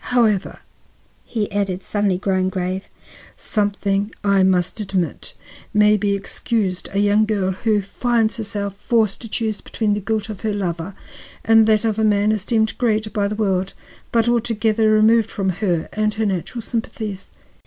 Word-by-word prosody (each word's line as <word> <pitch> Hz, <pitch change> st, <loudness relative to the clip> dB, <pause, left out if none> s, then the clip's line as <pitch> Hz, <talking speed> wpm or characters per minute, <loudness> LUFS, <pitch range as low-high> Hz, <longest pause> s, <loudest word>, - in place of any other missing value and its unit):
However," 220 Hz, -6 st, +1 dB, 0.6 s
he 215 Hz, -3 st, -3 dB
added, 195 Hz, -2 st, -1 dB
suddenly 205 Hz, -3 st, 0 dB
growing 185 Hz, -1 st, 0 dB
grave, 185 Hz, +1 st, -3 dB, 0.5 s
"something, 205 Hz, -1 st, -1 dB
I 200 Hz, -1 st, +3 dB
must 185 Hz, +1 st, +2 dB
admit, 190 Hz, -4 st, -2 dB, 0.4 s
may 210 Hz, 0 st, +5 dB
be 205 Hz, -1 st, +1 dB
excused 195 Hz, -1 st, -2 dB
a 200 Hz, -, -3 dB
young 205 Hz, +1 st, +4 dB
girl 200 Hz, -3 st, 0 dB
who 210 Hz, +2 st, 0 dB
finds 230 Hz, +2 st, 0 dB
herself 200 Hz, -2 st, -3 dB
forced 220 Hz, -1 st, +1 dB
to 225 Hz, -, -7 dB
choose 220 Hz, -1 st, -2 dB
between 215 Hz, -2 st, -1 dB
the 205 Hz, -, -1 dB
guilt 215 Hz, +1 st, -2 dB
of 210 Hz, -3 st, -7 dB
her 215 Hz, -2 st, -1 dB
lover 180 Hz, -2 st, -3 dB, 0.5 s
and 225 Hz, 0 st, +6 dB
that 215 Hz, 0 st, +3 dB
of 220 Hz, -1 st, 0 dB
a -, -, +2 dB
man 210 Hz, 0 st, +3 dB
esteemed 220 Hz, +1 st, 0 dB
great 215 Hz, -3 st, 0 dB
by 205 Hz, -2 st, +1 dB
the 210 Hz, -, -3 dB
world, 195 Hz, -3 st, -1 dB, 0.4 s
but 230 Hz, 0 st, +2 dB
altogether 225 Hz, -2 st, +2 dB
removed 220 Hz, +1 st, +4 dB
from 195 Hz, -4 st, -2 dB
her 175 Hz, -3 st, -1 dB
and 215 Hz, 0 st, 0 dB
her 220 Hz, 0 st, 0 dB
natural 200 Hz, +4 st, -2 dB
sympathies." 215 Hz, -4 st, -4 dB
210 Hz, 160 wpm, -21 LUFS, 195-220 Hz, 0.6 s, and